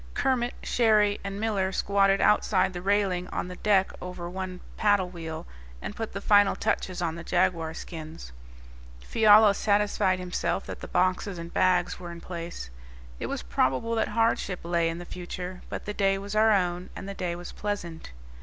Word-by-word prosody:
Kermit, 245 -2 +1
Cherrie, 215 -3 +3
and 195 0 -5
Miller 205 -4 0
squatted 195 0 +2
outside 190 -2 +3
the 175 - -5
railing 190 -2 +1
on - - -3
the 180 - -7
deck 195 -3 +3
over 180 -1 -6
one 185 0 -5 0.2
paddle 205 -4 +2
wheel 165 -3 -6 0.3
and 205 - -6
put 225 -1 -4
the 200 - -3
final 205 -1 +5
touches 180 -1 -1
on 165 -2 -1
the 170 +1 -7
jaguar 170 -3 +1
skins. 160 - -8 0.7
Fiala 215 -1 +6
satisfied 205 -2 +2
himself 180 +1 -2
that - - -7
the - - -7
boxes 185 +1 0
and 170 0 -8
bags 180 -1 +2
were 175 -1 -7
in 170 - -8
place. 170 - -7 0.5
It - - -3
was - - -4
probable 130 - 0
that 225 - +1
hardship 225 -4 0
lay 170 -1 +1
in 165 - -4
the 175 - -7
future; 180 +1 -6
but - - -5
the 210 - -3
day 195 -1 +2
was 200 +2 -6
our 220 +1 +5
own, 180 -3 0
and - - -7
the 200 - -4
day 180 -3 -3
was 175 0 -8
pleasant. 175 - -5
185 Hz, 180 wpm, -27 LUFS, 175-205 Hz, 0.7 s, Fiala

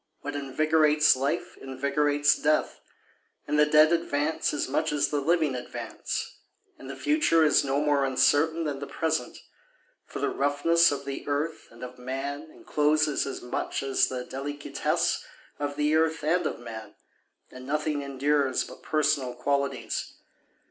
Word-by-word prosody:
What 145 0 -5
invigorates 150 +2 +3
life 140 +6 -2
invigorates 145 +2 +1
death, 155 0 0 0.7
And 150 - 0
the 150 - +5
dead 155 +2 +5
advance 160 -2 0
as 145 - -2
much 155 +4 0
as 145 -1 +1
the 145 -1 -1
living 160 -1 +2
advance, 125 -1 -5 0.4
And 135 - -10
the 135 - -6
future 295 - +2
is 150 - +4
no 140 0 0
more 145 -2 +2
uncertain 145 +5 +2
than 145 -3 -3
the 140 - -6
present, 160 -6 -2 0.7
For - - -8
the - - 0
roughness 145 +4 +3
of 140 -1 -4
the 140 0 -6
earth 145 +3 -2
and 115 +1 -13
of 125 0 -9
man 140 +4 -5
encloses 150 -1 0
as 135 - -6
much 125 - -3
as 135 -1 +2
the 125 -1 -5
delicatesse 145 +2 -2 0.4
of 145 -1 -3
the 150 +1 +1
earth 160 0 +1
and 170 +2 +1
of - - -4
man, 110 -3 -9 0.6
And 130 0 -11
nothing 150 0 -1
endures 140 0 0
but - - -12
personal 145 -5 0
qualities. 140 +2 -2
145 Hz, 150 wpm, -27 LUFS, 135-155 Hz, 0.7 s, the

